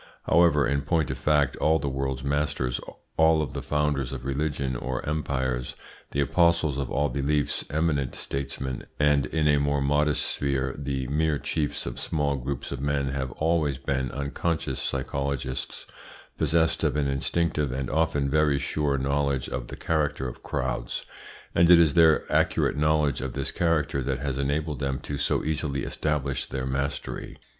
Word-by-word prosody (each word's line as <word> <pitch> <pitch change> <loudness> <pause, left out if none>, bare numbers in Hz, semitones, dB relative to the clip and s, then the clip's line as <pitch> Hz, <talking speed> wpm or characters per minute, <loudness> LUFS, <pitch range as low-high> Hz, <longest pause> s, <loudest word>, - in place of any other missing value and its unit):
However, 85 -4 +4
in 70 0 +1
point 80 -1 0
of - - -4
fact, 75 -1 +2
all 80 +1 +3
the 75 - -3
world's 65 -1 -2
masters, 70 -3 0 0.4
all 80 -1 +4
the 65 - -6
founders 75 -4 0
of 65 -2 -6
religions 70 -2 -1
or 65 +1 -4
empires, 65 -4 -1 0.3
the 70 - -3
apostles 85 -1 +2
of 70 - -2
all 75 +1 +1
beliefs, 70 +1 0
eminent 75 -4 0
statesmen, 65 -1 -4
and, 75 -3 +3
in 80 +2 +1
a 75 -1 +4
more 70 0 +1
modest 75 +1 +2
sphere, 70 -2 -1
the 70 -2 -3
mere 75 +3 +1
chiefs 75 0 -2
of - - -5
small 75 -3 0
groups 65 -1 -4
of 70 -2 -4
men 70 -1 0
have 65 -1 -2
always 80 -4 +1
been 65 -1 -1
unconscious 70 +1 -2
psychologists, 70 -1 -3 0.5
possessed 80 0 +2
of 75 -3 +1
an 75 -1 +1
instinctive 75 +1 0
and 65 0 -2
often 80 -2 +1
very 75 0 +3
sure 70 0 0
knowledge 70 -1 0
of - - -4
the - - -8
character 75 -4 0
of 65 - -8
crowds, 65 -4 -3 0.5
and 85 0 +5
it 90 -1 +9
is 80 -4 +5
their 80 -1 +5
accurate - - +2
knowledge 75 -3 +2
of 65 -1 -4
this 70 -1 -2
character 80 -5 +1
that 65 +1 -1
has 70 -1 -3
enabled 75 +2 -1
them 70 -2 -1
to 70 +2 -5
so - - +1
easily 75 -3 -1
establish 70 -3 -1
their 65 -1 -3
mastery. 70 +2 -3
70 Hz, 165 wpm, -26 LUFS, 65-75 Hz, 0.5 s, it